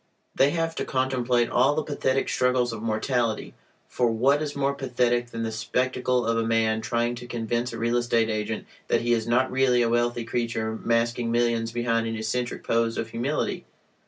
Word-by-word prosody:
They 135 - +4
have 165 +1 -1
to - - -1
contemplate 125 -2 0
all 135 +4 +3
the 155 - 0
pathetic 135 -2 0
struggles 125 -1 +1
of 110 - -6
mortality, 115 0 -1 0.3
for 125 -1 +1
what 135 +6 +2
is 150 -2 -3
more 140 0 +1
pathetic 120 -3 0
than 115 -1 -4
the 110 - -2
spectacle 125 +2 0
of 115 0 +1
a - - +1
man 110 -1 +1
trying 120 0 0
to 120 0 -8
convince 120 +1 -2
a - - -6
real 115 +1 +1
estate 115 -2 +2
agent 110 0 -3 0.2
that - - +2
he 120 0 +2
is 115 -1 0
not 125 +2 +2
really 130 -2 +3
a 115 - +1
wealthy 120 0 +1
creature 115 -1 -2
masking 115 0 +1
millions 115 -1 +1
behind 115 -1 0
an 115 - -3
eccentric 115 +3 -3
pose 115 0 +1
of 115 - -3
humility? 125 +6 -2
120 Hz, 190 wpm, -25 LUFS, 115-125 Hz, 0.3 s, They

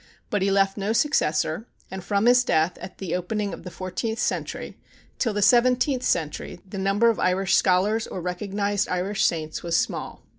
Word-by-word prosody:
But 205 - 0
he 195 - +2
left 195 0 +2
no 205 +2 -1
successor, 225 - +1 0.2
and 190 -1 -6
from 200 +2 0
his 245 +1 +6
death, 160 -5 +1
at - - -9
the 180 -4 -3
opening 200 +3 -2
of - - -8
the 180 - -8
fourteenth 185 +6 -4
century, - - -3 0.4
till 235 - +1
the 205 0 0
seventeenth 250 +4 +4
century 160 -11 -2
the 195 +1 -6
number 200 +4 +3
of 225 - -5
Irish 190 +1 +2
scholars 200 +5 +2
or - - -6
recognized 200 +3 -2
Irish 185 +3 -1
saints 155 -2 -1
was 170 -1 0
small. - - -3
195 Hz, 180 wpm, -24 LUFS, 180-220 Hz, 0.4 s, his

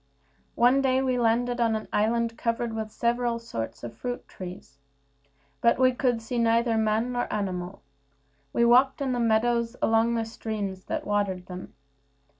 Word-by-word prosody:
One 250 +3 +4
day 260 -1 +2
we 255 -1 +1
landed 240 +1 +1
on 225 -1 +2
an 215 - -4
island 230 +2 +1
covered 230 0 -2
with 220 -1 -3
several 235 +1 0
sorts 115 - -6
of 120 -1 -7
fruit 245 - -5
trees, 180 -7 -10 0.8
but 235 - +4
we 255 0 +5
could 245 -3 0
see 240 +1 -2
neither 230 0 +2
man 220 +2 +1
nor 245 0 -2
animal 185 -2 -3 0.7
We 235 - +2
walked 260 +4 +5
in 275 -2 -1
the 245 - -1
meadows, 235 +1 +1
along 225 +1 +2
the 225 -1 -1
streams 210 -4 -5
that - - -3
watered 200 -3 -1
them. 180 0 -9
230 Hz, 160 wpm, -27 LUFS, 215-240 Hz, 0.8 s, we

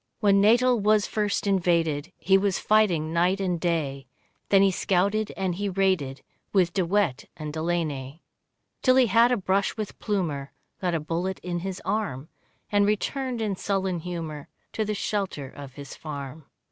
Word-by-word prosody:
When 200 -2 +4
Natal 240 +3 +4
was 210 0 +3
first 210 -1 -1
invaded 170 -5 +1
He 190 - +3
was 195 -1 +2
fighting 180 -8 +2
night 180 +3 +2
and 180 -3 -1
day, 145 -6 -1 0.4
Then 195 -1 +6
he 195 - +4
scouted 200 +4 +1
and 190 -2 0
he 200 +3 -2
raided, 180 -9 0 0.3
With 180 -4 +3
De 190 - +1
Wet 170 -7 0
and 150 -1 -5
Delaney. 155 -3 -2 0.6
Till 255 -1 +4
he 260 -1 +6
had 230 +3 +4
a 250 - +3
brush 195 +1 0
with 215 -2 -5
Plumer, 160 -10 -2 0.3
Got 180 -2 0
a - - +1
bullet 170 +5 -2
in 175 -1 -2
his 190 +1 -5
arm, 170 -9 -2 0.4
And 205 -1 +4
returned 245 +3 -1
in 205 -3 -1
sullen 190 -2 -1
humour 160 -4 -6 0.3
To 220 - 0
the 210 0 -2
shelter 195 -9 -2
of 140 -1 -10
his 140 -1 -9
farm. 145 -1 -7
185 Hz, 165 wpm, -26 LUFS, 160-205 Hz, 0.6 s, Then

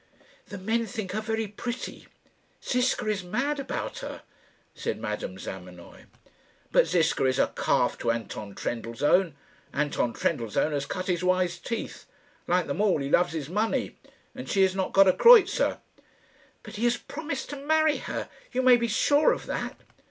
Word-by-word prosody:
"The 200 - -7
men 225 +4 -1
think 215 -6 -5
her 215 +3 -2
very 220 0 -2
pretty. 235 +4 -6 0.6
Ziska 250 -2 +1
is 205 -3 -1
mad 270 +11 -1
about 390 - -4
her," - - -7 0.5
said - - -4
Madame - - -4
Zamenoy. - - -10 0.7
"But - - +4
Ziska 165 -5 +2
is 130 0 +2
a - - +1
calf - - +1
to - - -1
Anton 110 -3 -4
Trendellsohn. 140 +9 0 0.4
Anton 140 -5 0
Trendellsohn 115 +6 0
has 140 -1 -2
cut 185 - -4
his 180 -1 -1
wise 185 -1 +1
teeth. 230 - -5 0.4
Like 180 0 +2
them 140 +8 -2
all, 210 -5 +3
he 140 0 -3
loves 175 -1 +3
his 155 -4 -4
money; 210 +7 -1 0.4
and - - -8
she 195 - +3
has 190 -1 +3
not 190 -1 -1
got 195 0 +6
a 185 - +6
kreutzer." 450 -5 +6 0.9
"But - - -9
he 230 - 0
has 240 0 +2
promised 290 -1 -6
to - - -4
marry 310 +2 +2
her. - - -5 0.2
You 255 +1 0
may 255 -1 +7
be 235 0 -1
sure 285 +7 +3
of - - -6
that." - - -4
200 Hz, 165 wpm, -27 LUFS, 165-250 Hz, 0.9 s, may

